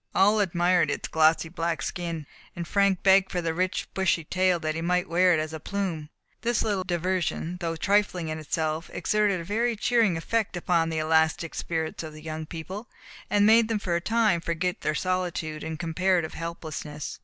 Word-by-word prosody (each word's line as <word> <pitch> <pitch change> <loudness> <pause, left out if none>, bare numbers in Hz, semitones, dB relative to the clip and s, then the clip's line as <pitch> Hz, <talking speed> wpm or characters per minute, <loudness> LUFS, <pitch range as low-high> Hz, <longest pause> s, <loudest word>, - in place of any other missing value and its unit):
All 205 +3 +5
admired 175 -3 +2
its 145 - -2
glossy 160 +1 +3
black 165 0 -2
skin, 170 -3 -4 0.3
and 170 -1 -5
Frank 200 -1 +2
begged 190 0 +5
for 180 - -1
the 165 -2 -1
rich 185 +3 -1
bushy 190 -3 +1
tail, 185 +2 +1
that 155 -1 -2
he 165 - -4
might 180 +2 +1
wear 180 +2 +4
it - - 0
as 155 0 -3
a 160 - -5
plume. 175 -4 -3 0.3
This 235 -1 +1
little 205 -4 0
diversion, 180 -1 -1
though 165 -2 -2
trifling 195 -2 +1
in 155 0 -3
itself, 155 +1 -2
exerted 210 -3 +1
a - - -5
very 230 +6 0
cheering 220 -5 +2
effect 210 +3 -1
upon 170 -2 +1
the 160 - -3
elastic 160 +1 +1
spirits 160 -2 -3
of 160 -2 -7
the 155 0 -12
young 155 0 -5
people, 185 +8 -7 0.4
and 205 0 +4
made 225 +1 +6
them 225 -1 0
for 185 -4 -1
a 170 - 0
time 220 -4 +2
forget 170 +2 -2
their 155 - 0
solitude 175 -2 -2
and 160 0 -4
comparative 175 0 0
helplessness. 155 -3 -6
175 Hz, 190 wpm, -26 LUFS, 160-190 Hz, 0.4 s, made